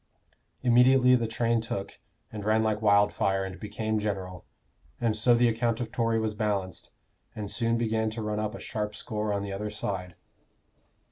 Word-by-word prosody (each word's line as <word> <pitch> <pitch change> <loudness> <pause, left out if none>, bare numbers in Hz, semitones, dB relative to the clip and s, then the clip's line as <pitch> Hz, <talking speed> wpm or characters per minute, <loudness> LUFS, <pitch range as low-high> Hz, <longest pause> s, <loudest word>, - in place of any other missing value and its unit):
Immediately 125 +1 +5
the 120 -2 +2
train 115 0 +1
took, 100 -3 -5 0.3
and 105 -2 -5
ran 110 +1 +2
like 110 -1 0
wildfire 100 -2 +3
and 95 -1 -8
became 110 +1 -2
general. 95 -4 -4 0.5
And 115 -2 +1
so 120 +3 +4
the 120 +1 +4
account 115 0 0
of 115 -2 -4
Tory 115 -1 +1
was 110 -1 -1
balanced, 100 -5 -2 0.5
and 105 -1 -5
soon 115 +2 +1
began 110 -1 0
to 110 0 -5
run 105 0 -2
up 110 +1 -2
a - - -8
sharp 105 -1 -4
score 105 -1 -3
on 100 -1 -1
the 100 -1 -5
other 105 +2 -3
side." 95 -4 -4
110 Hz, 175 wpm, -28 LUFS, 100-115 Hz, 0.5 s, Immediately